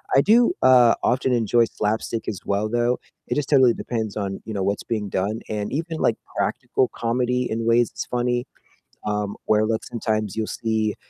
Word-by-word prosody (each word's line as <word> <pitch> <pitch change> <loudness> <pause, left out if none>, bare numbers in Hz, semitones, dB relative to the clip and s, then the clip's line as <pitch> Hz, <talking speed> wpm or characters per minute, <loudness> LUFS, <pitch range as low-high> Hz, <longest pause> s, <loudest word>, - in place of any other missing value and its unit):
I 135 - +7
do, 235 - +4
uh, 125 -2 +6
often 125 +1 +1
enjoy 120 0 +3
slapstick 110 +1 -2
as 95 - -3
well, 100 +2 0
though, 120 +2 +1 0.3
it - - -1
just 150 -3 -1
totally 130 -5 +5
depends 110 -4 -3
on, 100 -2 -3
you 110 - -5
know, 100 - -1
what's 100 +2 -1
being 105 -3 -3
done 100 +4 -2
and 105 -1 -3
even, 160 +2 -3
like, - - +2 0.2
practical 130 - 0
comedy 125 +1 0
in 115 +1 -2
ways 115 0 +3
is - - -4
funny, 120 0 0 0.6
um, 105 -1 -2
where 110 0 +3
look 110 0 -1
sometimes 110 -3 -2
you'll 110 -1 -2
see, 110 -2 -1
115 Hz, 185 wpm, -23 LUFS, 105-125 Hz, 0.6 s, I